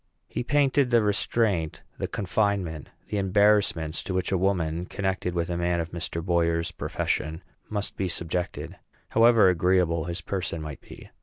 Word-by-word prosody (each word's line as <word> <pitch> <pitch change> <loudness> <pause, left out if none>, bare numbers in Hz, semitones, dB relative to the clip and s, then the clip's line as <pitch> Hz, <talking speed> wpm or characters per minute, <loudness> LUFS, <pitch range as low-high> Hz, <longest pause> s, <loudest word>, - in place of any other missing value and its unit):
He - - -3
painted 140 0 +2
the 120 -2 +4
restraint, 105 -5 +1 0.2
the - - -1
confinement, 95 -6 -1 0.2
the 105 - -1
embarrassments 95 -5 +2
to 95 - -3
which 90 0 -1
a 95 - +2
woman 90 -3 0
connected 95 -2 -2
with 85 -1 0
a 85 - -1
man 85 0 +1
of 85 0 -3
Mr. 85 -1 -4
Boyer's 85 -2 +1
profession 80 +3 -2 0.3
must 105 -1 -3
be 95 - 0
subjected, 85 +1 -3 0.3
however 115 -2 +6
agreeable 90 -2 +2
his 85 0 -4
person 90 -1 -3
might 75 -3 -7
be. - - -13
90 Hz, 155 wpm, -26 LUFS, 85-100 Hz, 0.3 s, however